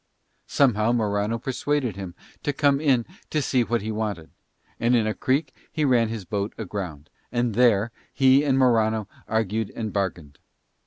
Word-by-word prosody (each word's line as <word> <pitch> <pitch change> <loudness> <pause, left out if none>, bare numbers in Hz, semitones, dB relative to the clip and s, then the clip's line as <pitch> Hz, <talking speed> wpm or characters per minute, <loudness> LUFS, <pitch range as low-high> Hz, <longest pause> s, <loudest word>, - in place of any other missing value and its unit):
Somehow 120 -4 +3
Morano 105 -1 0
persuaded 130 -1 -1
him 95 -3 -7 0.3
to 145 - 0
come 140 0 +2
in 130 -6 +3 0.2
to 155 - 0
see 130 -3 +1
what 115 -1 -1
he 110 - -3
wanted; 105 -7 -4 0.5
and 120 +1 +3
in 115 -2 +3
a 110 - 0
creek 140 +7 0 0.2
he 155 - 0
ran 120 -4 +3
his 110 -4 -5
boat 100 +2 -3
aground, 90 -8 -5 0.2
and 120 -2 0
there 115 -1 +3 0.2
he 135 +1 +4
and 135 -3 +2
Morano 110 -4 +2 0.2
argued 110 -1 -1
and 110 -2 -4
bargained. 85 -8 -3
115 Hz, 160 wpm, -24 LUFS, 105-130 Hz, 0.5 s, he